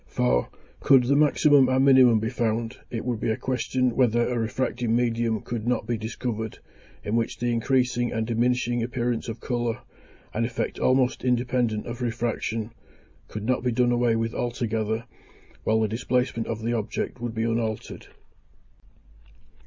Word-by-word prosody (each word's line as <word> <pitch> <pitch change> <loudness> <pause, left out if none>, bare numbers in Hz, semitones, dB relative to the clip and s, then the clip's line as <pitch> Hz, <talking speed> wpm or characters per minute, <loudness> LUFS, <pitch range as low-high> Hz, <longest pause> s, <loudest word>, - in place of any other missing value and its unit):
For, 60 0 +1 0.3
could 135 -2 +5
the 135 +3 +2
maximum 145 -2 +5
and 130 +1 +3
minimum 130 -4 +6
be 110 +2 -2
found, 115 -1 -1
it 115 -1 -4
would 120 -3 -1
be - - -1
a 110 - 0
question 130 -1 -1
whether 120 -2 +3
a 125 -1 -1
refracting 120 0 -1
medium 115 -2 0
could 115 -1 -5
not 120 -3 0
be 120 +1 -1
discovered, 110 0 -4 0.5
in 105 - -1
which 115 -1 -1
the 120 0 -1
increasing 120 0 +1
and 110 0 -1
diminishing 120 +1 +1
appearance 120 0 -2
of 115 0 -5
colour, 120 -2 -2 0.5
(an 115 - 0
effect 115 0 -3
almost 130 0 +2
independent 125 -3 0
of 120 +1 -6
refraction,) 115 -1 -2 0.6
could 105 - -6
not 130 +2 +1
be 125 0 0
done 120 +1 +2
away 120 -1 +2
with 115 0 -1
altogether, 115 -2 -2 0.6
while 110 0 +3
the 110 - +2
displacement 125 +1 -1
of 110 -1 -4
the 120 +1 0
object 115 +2 -3
would 120 -2 -4
be 110 - -1
unaltered. 115 -1 -3
120 Hz, 160 wpm, -25 LUFS, 115-125 Hz, 0.6 s, minimum